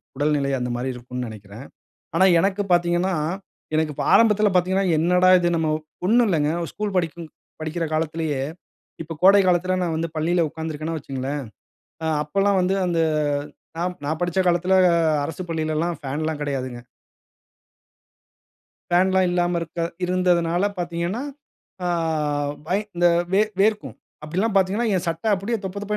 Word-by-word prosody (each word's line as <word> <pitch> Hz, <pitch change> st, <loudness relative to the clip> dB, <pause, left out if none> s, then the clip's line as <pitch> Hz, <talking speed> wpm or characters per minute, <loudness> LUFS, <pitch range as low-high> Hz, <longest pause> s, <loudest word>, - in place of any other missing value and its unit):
உடல்நிலை 145 Hz, -1 st, +1 dB
அந்தமாரி 125 Hz, +1 st, -2 dB
இருக்குன்னு 125 Hz, 0 st, -6 dB
நினைக்கிறேன். 105 Hz, +4 st, -11 dB, 0.5 s
ஆனா, 190 Hz, -, +5 dB, 0.2 s
எனக்கு 195 Hz, +2 st, 0 dB
பார்த்தீங்கன்னா, 175 Hz, +2 st, +2 dB, 0.6 s
எனக்கு 155 Hz, -1 st, 0 dB
இப்ப -, -, -3 dB
ஆரம்பத்தில 215 Hz, -2 st, +5 dB
பார்த்தீங்கன்னா 190 Hz, +2 st, +2 dB
என்னடா 180 Hz, +3 st, +3 dB
இது 175 Hz, 0 st, +1 dB
நம்ம 160 Hz, -1 st, 0 dB, 0.4 s
ஒன்னும் 235 Hz, +4 st, +4 dB
இல்லங்க 150 Hz, -4 st, +1 dB, 0.2 s
ஸ்கூல் 210 Hz, -2 st, -4 dB
படிக்கும் 165 Hz, -2 st, -2 dB, 0.3 s
படிக்கிற 155 Hz, +2 st, -3 dB
காலத்திலேயே 155 Hz, -3 st, -1 dB, 0.6 s
இப்ப 165 Hz, 0 st, -6 dB
கோடை 200 Hz, +2 st, +7 dB
காலத்தில 185 Hz, +1 st, +2 dB
நான் 170 Hz, -2 st, -1 dB
வந்து 165 Hz, +1 st, -2 dB
பள்ளியில 170 Hz, +2 st, +1 dB
உட்காந்திருக்கணா 160 Hz, 0 st, -5 dB
வச்சிக்கங்களேன், 140 Hz, -1 st, -4 dB, 0.6 s
ஆ -, -, -1 dB, 0.2 s
அப்பல்லாம் 195 Hz, +5 st, +1 dB
வந்து 185 Hz, +2 st, +1 dB
அந்த 170 Hz, -1 st, 0 dB, 0.8 s
நான் 180 Hz, +1 st, -2 dB
நான் 155 Hz, +1 st, -2 dB
படிச்ச 175 Hz, +1 st, 0 dB
காலத்தில 180 Hz, +2 st, +2 dB, 0.5 s
அரசுப் 165 Hz, +4 st, -6 dB
பள்ளியில 155 Hz, -1 st, -1 dB
எல்லாம் 170 Hz, -1 st, -1 dB
ஃபேன்ல்லாம் 150 Hz, +2 st, -3 dB
கிடையாதுங்க. 130 Hz, -4 st, -4 dB, 2.1 s
ஃபேன்லாம் 185 Hz, +1 st, +3 dB
இல்லாம 175 Hz, 0 st, +1 dB
இருக்க 170 Hz, +1 st, -6 dB, 0.2 s
இருந்ததுனால 180 Hz, 0 st, +1 dB
பார்த்தீங்கன்னா, 175 Hz, +6 st, -2 dB, 0.6 s
ஆ -, -, 0 dB, 0.8 s
வை 190 Hz, -, +2 dB, 0.2 s
இந்த 175 Hz, 0 st, +3 dB, 0.3 s
வே 200 Hz, +2 st, +5 dB, 0.2 s
வேர்க்கும். 215 Hz, +1 st, +1 dB, 0.3 s
அப்படிலாம் 190 Hz, +8 st, -1 dB
பார்த்தீங்கன்னா, 195 Hz, +5 st, +2 dB
என் 185 Hz, -, 0 dB
சட்ட 165 Hz, +4 st, -4 dB
அப்படியே 200 Hz, +5 st, -2 dB
தொப்ப 190 Hz, +1 st, -4 dB
தொப்ப 210 Hz, +1 st, -2 dB
170 Hz, 135 wpm, -23 LUFS, 155-185 Hz, 2.1 s, கோடை